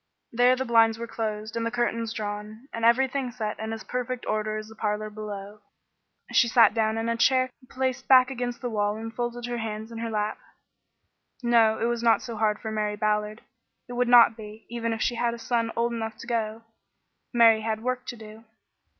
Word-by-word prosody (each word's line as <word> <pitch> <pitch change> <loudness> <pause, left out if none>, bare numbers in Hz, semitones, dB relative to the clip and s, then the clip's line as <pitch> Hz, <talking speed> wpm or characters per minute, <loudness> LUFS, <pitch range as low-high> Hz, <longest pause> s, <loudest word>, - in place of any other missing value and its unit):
There 245 +2 +4
the 260 +1 -3
blinds 225 -2 +4
were 235 - -5
closed 215 -2 -4
and 230 - -1
the 230 - 0
curtains 230 -1 -1
drawn, 215 +3 -6
and 230 - -5
everything 260 +2 +3
set 220 -3 -4
in 220 +1 -4
as 225 0 -5
perfect 250 0 -4
order 215 0 -1
as 215 - -5
in - - -15
the 220 - -13
parlor 215 0 -2
below. 210 -1 -7 0.7
She 235 - +4
sat 235 -1 +5
down 220 -1 +1
in 225 +1 -2
a 230 - +1
chair 255 +2 +3 0.2
placed 260 0 -2
back 255 0 +6
against 245 -1 -4
the 245 - -2
wall 205 -1 0
and 225 +1 -7
folded 240 0 -3
her 240 -1 -3
hands 220 0 -5
in 230 - -7
her 230 0 -3
lap. 215 -1 -2 1.0
No, 230 -2 +4
it - - -1
was 235 0 -1
not 230 -1 +3
so 235 - -6
hard 210 -1 +1
for 220 - -5
Mary 210 -1 -1
Ballard. 210 +1 -1 0.5
It 245 - -8
would 245 0 +1
not 240 -2 +7
be, 215 0 -11
even 230 -1 -2
if 225 0 -1
she 245 - +1
had 235 0 0
a - - -9
son 230 -1 -1
old 235 +1 0
enough 220 -1 -4
to - - -10
go. 225 -1 -2 0.7
Mary 230 -2 +5
had 220 0 -3
work 255 0 -2
to 240 - -5
do. 220 0 -12
230 Hz, 210 wpm, -26 LUFS, 215-240 Hz, 1.0 s, not